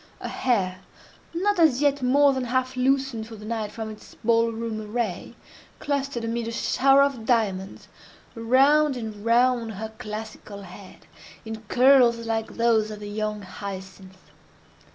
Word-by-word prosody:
Her - - -5
hair, 190 -8 0 0.5
not 385 +3 0
as 310 -7 +4
yet 285 -1 +2
more 275 +2 +4
than 260 -1 -2
half 255 +1 -1
loosened 260 -3 0
for 225 - -10
the 210 0 -11
night 220 -2 -3
from 220 -1 -6
its 215 - -13
ball 230 0 +3
room 225 -1 -4
array, 215 -2 -4 0.4
clustered, 275 -4 -2
amid 230 0 -2
a - - -3
shower 270 +4 +3
of 275 -5 -1
diamonds, 200 -5 -1 0.5
round 270 +5 +3
and 215 -3 -7
round 235 0 +2
her 220 +3 -6
classical 215 -2 -7
head, 185 +1 -13 0.4
in 220 0 -6
curls 250 0 +5
like 225 -1 -3
those 230 -2 +2
of 210 -1 -7
the 205 0 -7
young 210 0 -3
hyacinth. 190 0 -9
230 Hz, 150 wpm, -25 LUFS, 215-255 Hz, 0.5 s, curls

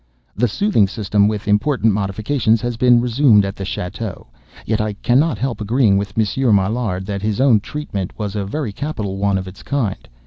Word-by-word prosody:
The 120 +5 +2
"soothing 120 - +2
system," 100 0 +1
with 105 -1 -3
important 110 +1 +2
modifications, 110 +4 0
has 120 -1 -2
been 120 0 +4
resumed 120 -4 +4
at 100 - -4
the 95 - -6
château; 95 +1 -5 0.4
yet 110 0 0
I 105 -1 -2
cannot 125 +6 +1
help 120 +1 -3
agreeing 110 -1 +2
with 100 +1 -3
Monsieur 115 +3 +1
Maillard, 100 -1 0
that 100 -1 -4
his 105 +1 -1
own 130 -5 +5
"treatment" 100 -7 -5
was 105 -2 -4
a 105 - -1
very 110 +4 -3
capital 105 -8 -4
one 100 0 +1
of 95 0 -5
its 95 - -11
kind. 115 - -3
105 Hz, 185 wpm, -19 LUFS, 100-125 Hz, 0.4 s, own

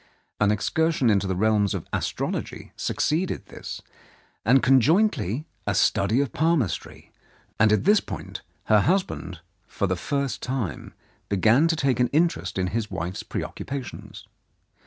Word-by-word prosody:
An 105 - +3
excursion 135 +5 +1
into 100 -1 +1
the 95 - -1
realms 105 0 +2
of - - -5
astrology - - -3
suc - - -3
ceeded 170 +5 0
this, - - -8 0.6
and 125 +5 +4
conjointly 135 - +3 0.2
a 105 - +1
study 105 +4 +2
of 140 - -3
palmistry, 155 - -1 0.5
and 110 -1 +5
at 105 - +2
this 205 +2 +5
point - - -7 0.2
her 110 - +4
husband, 150 - -1 0.3
for - - -2
the 95 -1 0
first 140 - -2
time, 125 - -4 0.3
began 110 - +4
to 165 - +1
take 135 -5 0
an 125 - +4
interest 155 - 0
in 95 - +1
his 115 -2 -1
wife's 90 +3 -4
preoccupations. 135 -2 -6
120 Hz, 140 wpm, -25 LUFS, 100-150 Hz, 0.6 s, and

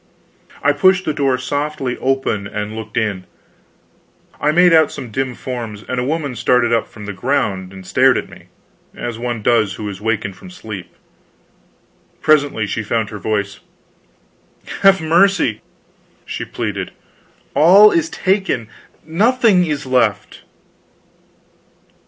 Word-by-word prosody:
I 145 - +4
pushed 185 +5 +3
the 155 - 0
door 135 -3 +1
softly 135 0 -3
open 130 -6 -1
and 105 +1 -5
looked 110 -1 -7
in. 100 -5 -1 1.1
I 150 - +2
made 175 +2 +5
out 160 -2 +5
some 125 -5 -8
dim 130 +2 -2
forms, 115 -5 -6
and 125 - -2
a - - -1
woman 145 -1 -2
started 120 0 +2
up 115 - +1
from 105 - -11
the 105 - -5
ground 95 -4 -1
and 95 -1 -11
stared - - +3
at - - -4
me, - - -15 0.5
as 120 -2 -5
one 120 -2 -3
does 110 -4 +2
who 105 - -6
is 100 -1 -7
wakened 105 -3 -2
from 185 - -13
sleep. 110 - -9 1.2
Presently 145 -8 +2
she 110 - -3
found 110 -1 -2
her 105 - -7
voice: 100 0 -2 1.2
"Have 195 -2 +5
mercy!" 170 - +2 0.6
she - - -5
pleaded. - - -4 0.6
"All 195 +7 +7
is 165 -1 +1
taken, 190 - -1 0.4
nothing 205 +1 +3
is 150 -3 -3
left." 110 -5 0
125 Hz, 135 wpm, -18 LUFS, 105-155 Hz, 1.2 s, All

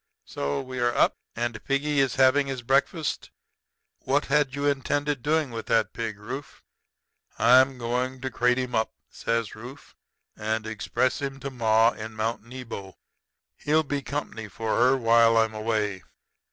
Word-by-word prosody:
'So 70 0 -3
we 130 -1 -6
are 120 0 +1
up? - - +3 0.2
And 120 -2 -3
piggy 140 +1 0
is 135 -2 +2
having 135 +2 +4
his 130 -3 -4
breakfast. 140 +5 0 0.7
What 140 +3 0
had 140 -1 +1
you 140 0 -2
intended 145 0 0
doing 155 -1 +1
with 115 -1 -6
that 110 -4 +2
pig, 115 -3 -4
Rufe?' 130 +7 -8 0.7
"'I'm 130 +3 +5
going 125 +2 -2
to 130 -1 -3
crate 125 +2 +2
him 125 -1 -3
up,' 110 0 0 0.2
says 115 -2 -2
Rufe, 125 +6 -11 0.4
'and 110 0 -2
express 110 +6 -1
him 135 -1 -4
to 140 - -5
ma 115 -2 +3
in 110 0 -8
Mount 110 +2 -2
Nebo. 115 -6 -8 0.6
He'll 155 +2 +2
be 145 -1 -2
company 135 -6 -5
for 110 +2 -2
her 130 +3 +4
while 115 -1 +5
I 115 - +6
am 110 - -8
away.' 110 -3 -1
125 Hz, 160 wpm, -26 LUFS, 110-135 Hz, 0.7 s, I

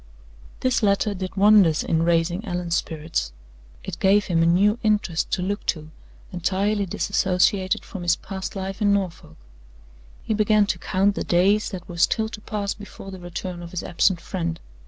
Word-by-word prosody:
This 255 -2 +1
letter 205 0 +2
did 185 -1 -6
wonders 195 -6 +5
in 160 - +1
raising 170 +3 +1
Allan's 175 -4 -2
spirits. 155 - -2 0.5
It 190 - -6
gave 200 +1 +4
him 165 -2 +1
a 165 - +4
new 205 +6 +3
interest 210 -7 0
to 180 - 0
look 200 +2 -2
to, 155 -1 -2 0.4
entirely 200 +3 0
disassociated 185 +1 +1
from 195 - -7
his 175 0 +2
past 190 0 -7
life 195 +2 -5
in 205 -1 +4
Norfolk. 180 - -3 0.9
He - - -1
began 215 0 +3
to 180 -3 -2
count 195 +3 +1
the - - -3
days 195 +5 +2
that 185 -3 -8
were 175 - -8
still 220 +5 +2
to 210 - -9
pass 205 -2 -3
before 205 -1 -11
the 190 - -8
return 175 0 -6
of 170 - -8
his 180 0 -5
absent 175 +1 +1
friend. 165 -3 -4
190 Hz, 175 wpm, -23 LUFS, 175-205 Hz, 0.9 s, wonders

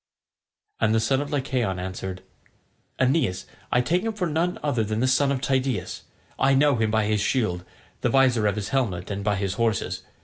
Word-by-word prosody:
And 110 0 +2
the - - +4
son 130 +5 +1
of 145 - -5
Lycaon 130 -8 -1
answered, 95 0 -5 0.7
"Aeneas, 130 - +1 0.3
I 125 - +4
take 170 +9 +1
him 225 +1 -2
for 200 -4 -2
none 170 +2 0
other 130 -7 +1
than 110 +1 -2
the 125 - +2
son 135 +2 +3
of 135 -2 -1
Tydeus. 130 -3 -1 0.4
I 135 0 +4
know 140 -1 +4
him 110 -1 +1
by 110 0 +1
his 105 -1 +1
shield, 95 -10 0 0.4
the - - +1
visor 125 -5 +3
of 100 - +1
his 105 -2 -4
helmet, 105 -9 -1
and 100 0 -3
by 105 0 +1
his 100 -1 -2
horses. 110 -4 0
120 Hz, 195 wpm, -25 LUFS, 105-135 Hz, 0.7 s, the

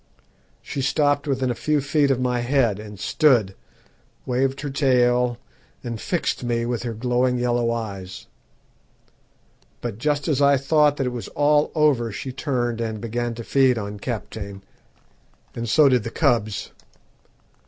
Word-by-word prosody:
She 140 - -4
stopped 145 +1 +1
within 130 -2 0
a - - 0
few 150 +5 0
feet 145 +1 +1
of 135 -2 +1
my 125 -1 0
head, 120 -4 +1
and 105 -2 -10
stood, 120 -6 +3 0.7
waved 130 +2 0
her 145 -2 -4
tail, 125 -3 +2 0.5
and 115 -3 -5
fixed 175 -7 -2
me 120 -1 -1
with 120 -1 -2
her 120 -2 -4
glowing 125 +2 +1
yellow 120 -1 +1
eyes; 100 -5 -5 1.5
but 115 -3 -5
just 145 +3 0
as 145 -3 +1
I 140 0 +5
thought 145 +1 +3
that 135 - -1
it 125 - -1
was 120 - -5
all 150 0 +2
over 140 -7 +2
she 130 +6 -5
turned 120 -4 -2
and 110 -2 -3
began 120 +1 -3
to 115 - -7
feed 130 0 +3
on 105 -1 -5
Kaptein, 100 -4 -6 0.9
and 120 -1 -4
so 150 +6 +5
did 125 -3 +3
the 115 - -4
cubs. 115 -6 0
125 Hz, 155 wpm, -23 LUFS, 115-140 Hz, 1.5 s, I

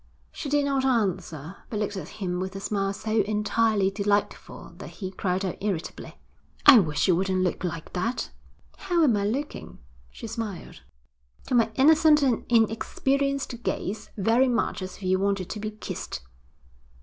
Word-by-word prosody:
She 290 - -6
did 290 0 +2
not 275 -1 +1
answer, 190 - -1
but 215 - -3
looked 210 -1 -2
at 190 - -5
him 180 -4 -4
with 190 +1 -4
a - - -4
smile 195 -1 -1
so 215 +2 0
entirely 210 -1 +1
delightful 205 0 -2
that - - -8
he 190 -3 -6
cried 190 0 -1
out 185 - -3
irritably: 190 -5 -4 0.5
'I 270 -5 +10
wish 155 -4 +1
you 180 - +5
wouldn't 185 +1 +1
look 180 0 -1
like 165 -2 -5
that.' 205 +8 -2 0.5
'How 350 -3 +1
am 250 -8 +4
I 200 -1 0
looking?' 275 +7 -4 0.3
she - - -10
smiled. 220 -5 -6 0.6
'To - - -4
my 230 -2 +3
innocent 305 +2 +5
and 250 -4 +1
inexperienced 245 +3 +1
gaze 210 -1 -3
very 230 +6 +3
much 235 -5 0
as 185 0 -6
if - - -13
you 185 0 +2
wanted 195 -2 -1
to 215 - -5
be 215 +1 -3
kissed.' 210 - -6
210 Hz, 165 wpm, -26 LUFS, 190-240 Hz, 0.6 s, I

